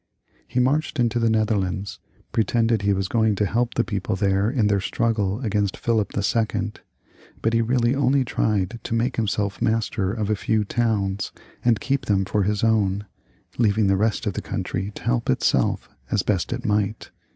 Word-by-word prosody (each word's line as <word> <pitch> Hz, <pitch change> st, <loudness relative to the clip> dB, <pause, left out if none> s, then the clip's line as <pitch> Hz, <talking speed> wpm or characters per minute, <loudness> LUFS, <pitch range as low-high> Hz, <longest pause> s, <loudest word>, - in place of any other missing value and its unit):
He 125 Hz, -, -1 dB
marched 145 Hz, +3 st, +1 dB
into 120 Hz, -1 st, +2 dB
the 115 Hz, -1 st, +2 dB
Netherlands, 100 Hz, -3 st, 0 dB, 0.3 s
pretending 115 Hz, +1 st, +2 dB
he 100 Hz, +1 st, +1 dB
was 95 Hz, -1 st, 0 dB
going 110 Hz, 0 st, +2 dB
to 105 Hz, -, +1 dB
help 120 Hz, +5 st, 0 dB
the 120 Hz, -, +2 dB
people 100 Hz, -4 st, -2 dB
there 100 Hz, +1 st, +1 dB
in 120 Hz, -4 st, +1 dB
their 100 Hz, -1 st, +2 dB
struggle 105 Hz, -1 st, 0 dB
against 105 Hz, -4 st, 0 dB
Philip 115 Hz, -4 st, 0 dB
II., 110 Hz, +1 st, 0 dB, 0.7 s
but 115 Hz, -, +2 dB
he 115 Hz, -, +3 dB
really 120 Hz, +1 st, +2 dB
only 135 Hz, -1 st, +2 dB
tried 110 Hz, -1 st, 0 dB
to 115 Hz, -, -3 dB
make 120 Hz, +3 st, 0 dB
himself 100 Hz, -2 st, -1 dB
master 110 Hz, -3 st, 0 dB
of 110 Hz, -1 st, -2 dB
a -, -, +3 dB
few 110 Hz, +1 st, 0 dB
towns 100 Hz, -3 st, -1 dB, 0.3 s
and 120 Hz, -3 st, +3 dB
keep 140 Hz, 0 st, -1 dB
them 95 Hz, -2 st, +2 dB
for 105 Hz, +2 st, 0 dB
his 105 Hz, +2 st, 0 dB
own, 105 Hz, -3 st, +2 dB, 0.5 s
leaving 110 Hz, -2 st, +3 dB
the 95 Hz, 0 st, +3 dB
rest 110 Hz, +3 st, 0 dB
of 100 Hz, -, -1 dB
the -, -, -3 dB
country 95 Hz, +2 st, -3 dB
to -, -, -9 dB
help 120 Hz, 0 st, 0 dB
itself 65 Hz, -, +1 dB, 0.2 s
as -, -, +1 dB
best -, -, 0 dB
it -, -, -4 dB
might. 105 Hz, 0 st, -1 dB
110 Hz, 180 wpm, -23 LUFS, 100-115 Hz, 0.7 s, he